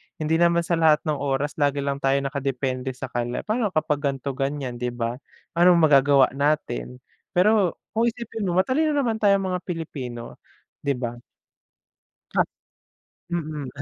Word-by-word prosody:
hindi 160 +1 0
naman 170 0 +4
sa 170 0 0
lahat 155 -2 +4
ng 155 -3 -1
oras 140 +2 -1
lagi 140 -1 +1
lang 140 0 -2
tayo 135 0 +2
nakadepende 135 -2 -2
sa 130 0 -7
kanila 120 0 -2
pa'no 215 0 0
kapag 155 -2 +1
ganito, 140 -1 -2
ganyan, 135 -2 -3
'di 125 0 -1
ba? 120 +2 -3 0.4
Anong 175 -1 +6
magagawa 140 -2 +5
natin? 130 - -1 0.3
Pero, 195 0 +4 0.2
kung 230 +2 +2
isipin 225 -3 -4
mo 175 - 0
matalino 290 +10 +2
naman 235 -6 0
tayong 200 -2 +3
mga 180 - -1
Pilipino, 135 -9 -6 0.4
'di 140 -2 -1
ba? 120 -1 -4 1.1
Ha, - - +4 0.9
mm, 155 -5 -3
145 Hz, 150 wpm, -24 LUFS, 135-175 Hz, 1.1 s, Anong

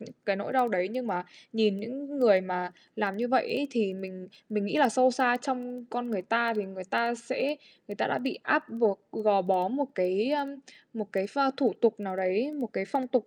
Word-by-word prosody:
những 225 - -12 0.2
cái 200 -1 +2
nỗi 200 - -4
đau 255 -2 +4
đấy, 185 -3 0
nhưng 250 +1 -3
mà 180 -4 -2 0.3
nhìn 215 -3 +2
những 275 +6 -6
người 210 -7 +7
mà 180 -1 -3 0.3
làm 200 -2 -1
như 240 +3 -1
vậy 260 - +2
ấy, 285 +2 0
thì 215 -7 0
mình 185 -1 -9 0.2
mình 210 -2 -1
nghĩ 205 - -1
là 285 -4 +6
sâu 255 +3 +5
xa 245 -1 +3
trong 250 -2 -4
con 245 0 -3
người 200 -4 -1
ta 230 +4 +2
thì 210 -1 -1
người 190 -1 -8
ta 235 +5 +1
sẽ 260 +5 -2 0.3
người 205 - -5
ta - - 0
đã - - 0
bị 265 - -3
áp 300 0 +2
buộc, 225 -4 +1
g - - -8
gò 200 -2 +5
bó 185 -1 +2
một 280 +4 -1
cái, 190 +6 +1
ờm, 280 -1 -1 0.4
một 215 -2 -5
cái 190 0 0
pho 275 +5 +2
thủ 260 -5 +3
tục 225 -2 +3
nào 190 -2 -4
đấy, 190 +9 0
một 280 -5 -3
cái 195 - -1
phong 260 +4 -2
tục, 250 -3 +1
225 Hz, 240 wpm, -29 LUFS, 195-255 Hz, 0.4 s, người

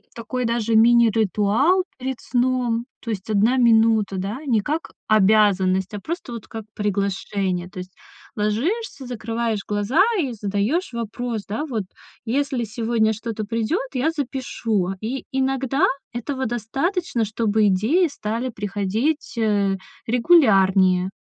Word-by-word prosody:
такой 245 +2 -3
даже 230 -1 0
мини-ритуал 230 - +4
перед 260 -1 -4
сном. 245 -2 0 0.2
То 230 - -7
есть 205 -1 -4
1 220 +5 +3
минута, 225 -4 +4
да, 200 +7 -3
не 225 -6 +2
как 310 +8 -3 0.2
обязанность, 195 -2 +3
а 205 - -4
просто 320 - -5
вот 230 -2 -7
как 225 -1 -7
приглашение. 195 -2 -2
То 185 - -9
есть 180 0 -8 0.4
ложишься, 270 - -1
закрываешь 230 -2 -2
глаза 210 - +1 0.2
и 265 -4 -2
задаешь 215 - -1
вопрос, 230 -1 -4
да, 225 +9 -2
вот: 230 -9 -3 0.4
"Если 265 +1 -1
сегодня 225 0 0
что-то 220 0 -4
придет, 230 - -1
я 260 +5 +1
запишу",- 240 - -2
и 245 +5 -4
иногда 270 +1 +1 0.3
этого 260 +2 -3
достаточно, 240 - -1
чтобы 215 0 +1
идеи 235 - +3
стали 230 -2 -3
приходить, 210 +8 -2
э, 205 -3 +2 0.3
регулярнее. 195 - +4
225 Hz, 125 wpm, -22 LUFS, 205-255 Hz, 0.4 s, мини-ритуал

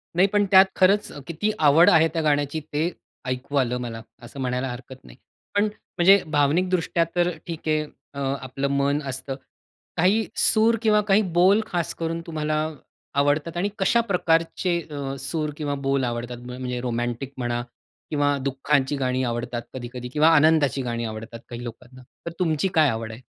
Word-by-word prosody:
नाही 185 +3 +5
पण 205 0 +2
त्यात 190 0 +9
खरंच 200 +2 +3 0.2
किती 170 +6 -1
आवड 155 +3 +6
आहे 160 -1 +5
त्या 165 - 0
गाण्याची 145 0 +1
ते 160 +4 0 0.3
ऐकू 130 +3 -4
आलं 125 -2 +1
मला, 115 -2 -5 0.2
असं 120 +3 -10
म्हणायला 125 0 -1
हरकत 130 +1 -10
नाही. - - -15 0.4
पण 205 - +4
म्हणजे 195 -2 +3
भावनिक 150 +5 +2
दृष्ट्या 170 -2 +1
तर 175 0 +3 0.2
ठीक 165 -2 -6
आहे. 155 0 +2 0.3
अ, 140 - -7 0.2
आपलं 135 +1 -3
मन 140 +1 +1
असतं. 135 0 -4 0.6
काही 200 +6 +3
सूर 225 +1 +4
किंवा 215 -2 +4
काही 200 +1 +5 0.2
बोल 195 +5 +5
खास 175 -3 -2
करून 165 0 -3
तुम्हाला 155 -1 -1 0.6
आवडतात 145 +4 +1
आणि 195 +4 0
कशा 235 +5 +3
प्रकारचे 175 -3 +1
अ, 140 -2 -4
सूर 150 +3 -2
किंवा 145 -2 -2
बोल 135 -1 +2
आवडतात? 120 0 -3
म्हणजे 125 0 -4
रोमॅटिक 120 +2 -3
म्हणा 120 -1 -1 0.5
किंवा 145 -1 +1
दुःखांची 140 +1 0
गाणी 130 -1 0
आवडतात 120 0 -3
कधी-कधी 125 -1 -6
किंवा 155 +1 +4
आनंदाची 145 -3 +4
गाणी 120 -1 -3
आवडतात 110 +1 -7
काही 120 0 -7
लोकांना. 120 +2 -10 0.2
तर 170 - -4
तुमची 165 0 +1
काय 155 -5 +5
आवड 110 -1 -3
आहे? 115 +3 -10
145 Hz, 165 wpm, -24 LUFS, 125-170 Hz, 0.6 s, त्यात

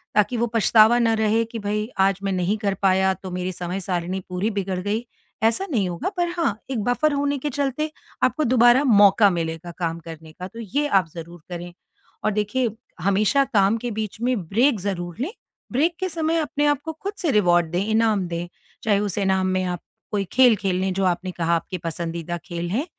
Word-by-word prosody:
ताकि 210 +4 +2
वो 235 +1 +1
पछतावा 225 +1 +6
ना 230 -1 +3
रहे 220 +1 +2
कि 230 - -4
भई 210 +1 -2
आज 195 0 +3
मैं 195 - 0
नहीं 185 +3 0
कर 200 -2 0
पाया 190 0 +4
तो 185 0 -9
मेरी 180 +1 -2
समय 180 +2 -4
सारिणी 180 0 -2
पूरी 185 +4 -1
बिगड़ 190 -2 -1
गई 210 +5 -2 0.4
ऐसा 225 +12 +2
नहीं 210 -8 +1
होगा। 175 - -3
पर 350 -1 +1
हाँ 230 -12 +1
एक 230 -5 -1
बफ़र 290 +5 +2
होने 285 0 0
के 295 - -2
चलते 285 +2 -2 0.3
आपको 310 - +2
दोबारा 245 +1 +5
मौका 205 -3 +6
मिलेगा 165 0 -3
काम 165 -1 -2
करने 160 -1 -10
का 180 +3 -8
तो 230 +4 -11
ये 275 +7 -1
आप 195 -9 +3
ज़रूर 170 0 -9
करें। 175 0 -6 0.5
और 215 - +3
देखिए 215 +4 0 0.3
हमेशा 205 - +3
काम 200 +1 +4
के 240 - -1
बीच 215 +1 -6
में 250 +1 +1
ब्रेक 235 +2 +3
ज़रूर 175 -3 -4
लें। 305 +9 -2 0.4
ब्रेक 320 +7 +2
के 375 0 -1
समय 325 -1 0
अपने 295 -2 0
आपको 290 +2 0
खुद 390 +6 -5
से 345 - -1
रिवार्ड 175 -6 +3
दें, 180 +3 0
इनाम 220 -4 +2
दें, 170 0 -4 0.4
चाहे 205 -3 +3
उस 205 -2 -2
इनाम 190 -1 +1
में 185 0 0
आप 180 -1 -3 0.3
कोई 205 -2 0
खेल, 250 -3 +6
खेल 190 -2 -1
लें 190 0 0
जो 195 +1 -1
आपने 180 +1 0
कहा 170 -1 0
आपके 170 +3 -3
पसंदीदा 170 +1 -3
खेल 170 -2 -4
हैं 240 - -1
205 Hz, 205 wpm, -23 LUFS, 180-240 Hz, 0.5 s, पछतावा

